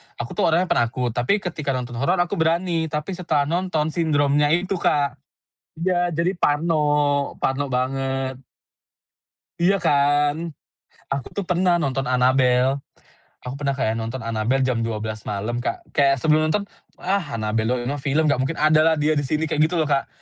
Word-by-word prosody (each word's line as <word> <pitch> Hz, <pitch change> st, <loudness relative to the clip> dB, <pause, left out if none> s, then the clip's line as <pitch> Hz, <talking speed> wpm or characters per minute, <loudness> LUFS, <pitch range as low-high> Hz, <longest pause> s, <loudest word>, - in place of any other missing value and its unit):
Aku 120 Hz, -, -6 dB
tuh -, -, +1 dB
orangnya 165 Hz, +2 st, +3 dB
penakut, 120 Hz, +1 st, +1 dB
tapi 125 Hz, -, 0 dB
ketika 155 Hz, -6 st, -2 dB
nonton 120 Hz, -2 st, -5 dB
horor 140 Hz, +7 st, +2 dB
aku 175 Hz, -2 st, -1 dB
berani, 165 Hz, 0 st, +1 dB
tapi 150 Hz, +3 st, -4 dB
setelah 170 Hz, -5 st, 0 dB
nonton 160 Hz, 0 st, -1 dB
sindromnya 145 Hz, -3 st, +2 dB
itu 180 Hz, +4 st, 0 dB
Kak, 145 Hz, -3 st, +1 dB, 0.6 s
iya, 175 Hz, -1 st, +1 dB
jadi 170 Hz, +3 st, +1 dB
parno, 155 Hz, 0 st, +1 dB, 0.6 s
parno 135 Hz, +2 st, 0 dB
banget. 135 Hz, 0 st, -2 dB, 1.2 s
Iya, 195 Hz, +3 st, +3 dB
kan. 145 Hz, +3 st, +2 dB, 0.6 s
Aku 140 Hz, -2 st, -2 dB
tuh 200 Hz, -, -2 dB
pernah 180 Hz, 0 st, +2 dB
nonton 135 Hz, -5 st, -1 dB
Annabelle. 130 Hz, +1 st, +3 dB, 0.6 s
Aku 125 Hz, +2 st, -6 dB
pernah 140 Hz, -2 st, -1 dB
kayak 115 Hz, -4 st, -1 dB
nonton 115 Hz, +2 st, -5 dB
Annabelle 115 Hz, +4 st, 0 dB
jam 125 Hz, -2 st, 0 dB
12:00 110 Hz, -1 st, -4 dB
malam, 105 Hz, +4 st, -2 dB
Kak, 120 Hz, -, -5 dB
kayak 140 Hz, -1 st, +4 dB
sebelum 155 Hz, 0 st, +3 dB
nonton, 200 Hz, +6 st, 0 dB, 0.3 s
"Ah, 185 Hz, -8 st, -2 dB
Annabelle 110 Hz, 0 st, -1 dB
doang, 125 Hz, 0 st, 0 dB
ini 130 Hz, -, -2 dB
mah 145 Hz, -, -4 dB
film 145 Hz, +3 st, +1 dB
nggak 140 Hz, -, +2 dB
mungkin 135 Hz, +5 st, -1 dB
ada 155 Hz, 0 st, +4 dB
lah 160 Hz, 0 st, +4 dB
dia 155 Hz, +1 st, +2 dB
di 145 Hz, -, 0 dB
sini", 155 Hz, +1 st, 0 dB
kayak 155 Hz, -1 st, -2 dB
gitu 180 Hz, -, -4 dB
loh, 155 Hz, -, +1 dB
Kak. 140 Hz, -1 st, +1 dB
145 Hz, 170 wpm, -22 LUFS, 125-160 Hz, 1.2 s, kayak